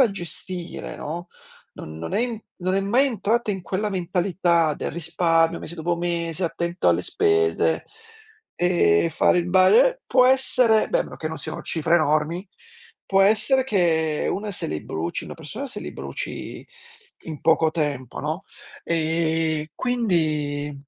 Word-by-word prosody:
a 245 Hz, -6 st, +5 dB
gestire, 180 Hz, -1 st, -6 dB
no, 170 Hz, +4 st, -5 dB, 0.5 s
non 80 Hz, 0 st, -9 dB
non 80 Hz, 0 st, -5 dB
è -, -, +2 dB
i 235 Hz, -3 st, -2 dB, 0.2 s
non 185 Hz, +1 st, -1 dB
è 195 Hz, -, +2 dB
mai 235 Hz, +8 st, +3 dB
entrata 230 Hz, -1 st, 0 dB
in 190 Hz, -, -5 dB
quella 195 Hz, +4 st, -2 dB
mentalità 175 Hz, -3 st, +1 dB
del -, -, -4 dB
risparmio, 165 Hz, 0 st, +1 dB
mese 170 Hz, -, -7 dB
dopo 170 Hz, +1 st, -1 dB
mese, 170 Hz, 0 st, -2 dB
attento 170 Hz, +1 st, -1 dB
alle -, -, +2 dB
spese, 420 Hz, 0 st, +1 dB, 0.7 s
ehm, 170 Hz, -, +3 dB
fare 175 Hz, -, +3 dB
il 175 Hz, -, -1 dB
ba 185 Hz, 0 st, +6 dB
eh, -, -, +5 dB
può 255 Hz, -1 st, +4 dB
essere 255 Hz, -4 st, +3 dB
beh -, -, +2 dB
a -, -, +2 dB
meno -, -, -10 dB
che 155 Hz, -, -4 dB
non 160 Hz, -, -6 dB
siano -, -, -6 dB
cifre 165 Hz, +1 st, 0 dB
enormi, 155 Hz, +4 st, 0 dB, 0.6 s
può 195 Hz, 0 st, +3 dB
essere 220 Hz, +6 st, +3 dB
che 160 Hz, -, +1 dB
una 210 Hz, +1 st, -3 dB
se 190 Hz, -, -4 dB
li 75 Hz, 0 st, -4 dB
bruci 80 Hz, +2 st, -4 dB
una -, -, -8 dB
persona 210 Hz, -, -7 dB
se 260 Hz, -, -7 dB
li -, -, -7 dB
bruci -, -, -6 dB, 0.6 s
in 155 Hz, -3 st, -7 dB
poco 160 Hz, 0 st, +3 dB
tempo, 145 Hz, -6 st, -3 dB
no. 155 Hz, +7 st, -3 dB, 0.4 s
Ehm, 160 Hz, -1 st, 0 dB
quindi 155 Hz, -, 0 dB
175 Hz, 160 wpm, -23 LUFS, 160-205 Hz, 0.7 s, ba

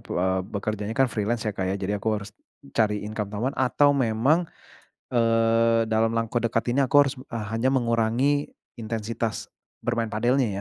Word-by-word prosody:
eee, 95 Hz, +1 st, 0 dB
bekerjanya 105 Hz, +1 st, -3 dB
kan 135 Hz, -1 st, +4 dB
freelance 110 Hz, +2 st, -1 dB
ya, 105 Hz, -, -1 dB
Kak, 95 Hz, -1 st, -3 dB
ya, 95 Hz, -, 0 dB
jadi 100 Hz, +1 st, -2 dB
aku 110 Hz, -, -2 dB
harus 105 Hz, -, -9 dB, 0.4 s
cari 105 Hz, -2 st, +1 dB
income 105 Hz, -1 st, -4 dB
tambahan 115 Hz, +6 st, -3 dB
atau 145 Hz, +2 st, +3 dB
memang, 135 Hz, +7 st, +2 dB, 0.7 s
eee, 115 Hz, -1 st, +3 dB
dalam 110 Hz, +1 st, +2 dB
langkah 115 Hz, 0 st, -1 dB
dekat 115 Hz, +1 st, 0 dB
ini 140 Hz, -, +4 dB
aku 130 Hz, -, -1 dB
harus 135 Hz, -, -3 dB
b 130 Hz, -, -11 dB
e 115 Hz, -, -3 dB, 0.2 s
hanya 130 Hz, +4 st, +1 dB
mengurangi 120 Hz, +3 st, +1 dB, 0.2 s
intensitas 115 Hz, -2 st, -4 dB, 0.3 s
bermain 115 Hz, -1 st, -1 dB
padelnya 120 Hz, +4 st, +2 dB
115 Hz, 165 wpm, -25 LUFS, 110-125 Hz, 0.7 s, kan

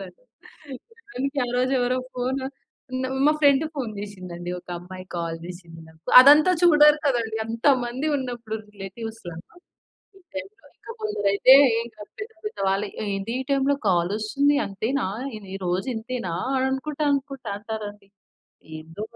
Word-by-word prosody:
అసలు. -, -, -9 dB, 0.9 s
సమయానికి 285 Hz, -, -4 dB
ఆ -, -, -6 dB
రోజు 255 Hz, +1 st, +1 dB
ఎవరో 250 Hz, +1 st, +1 dB, 0.2 s
ఫోను, 260 Hz, +2 st, -2 dB, 0.8 s
మా 300 Hz, -, +6 dB
ఫ్రెండ్ 285 Hz, 0 st, +5 dB
ఫోను 250 Hz, -7 st, -3 dB
చేశిందండి. 180 Hz, -4 st, -7 dB
ఒక -, -, -41 dB
అమ్మాయి 185 Hz, +1 st, -10 dB
కాల్ 165 Hz, -1 st, -3 dB
జేశింది 170 Hz, -2 st, -10 dB
నాకు. 160 Hz, 0 st, -20 dB, 0.2 s
అదంతా 295 Hz, +6 st, +7 dB
చూడరు 300 Hz, -3 st, +7 dB
కదండీ! 230 Hz, -4 st, 0 dB
అంతమంది 245 Hz, +3 st, +1 dB
ఉన్నప్పుడు 240 Hz, -4 st, -4 dB
రిలేటివ్స్‌లో. 200 Hz, -2 st, -8 dB, 0.8 s
ఈ -, -, -18 dB, 0.2 s
టైంలో 395 Hz, +8 st, -8 dB
ఇంక -, -, -18 dB
కొందరైతే 230 Hz, -, +5 dB, 0.3 s
ఇంక 235 Hz, -, -13 dB
అంతే. 415 Hz, -, -8 dB, 0.9 s
"ఏంది 195 Hz, +3 st, -3 dB
ఈ -, -, -1 dB
టైంలో 275 Hz, +1 st, +2 dB
కాలొస్తుంది? 215 Hz, +11 st, +2 dB
అంతేనా? 220 Hz, +6 st, -2 dB, 0.3 s
ఇది 195 Hz, -2 st, -10 dB
రోజూ 180 Hz, +7 st, -1 dB
ఇంతేనా 225 Hz, -6 st, -4 dB, 0.4 s
అనుకుంటా, 285 Hz, +3 st, -3 dB
అనుకుంటా" 275 Hz, -4 st, -4 dB
అంటారండి. 210 Hz, -2 st, -7 dB, 0.7 s
ఏందో 165 Hz, +6 st, -8 dB
235 Hz, 120 wpm, -24 LUFS, 195-275 Hz, 0.9 s, అదంతా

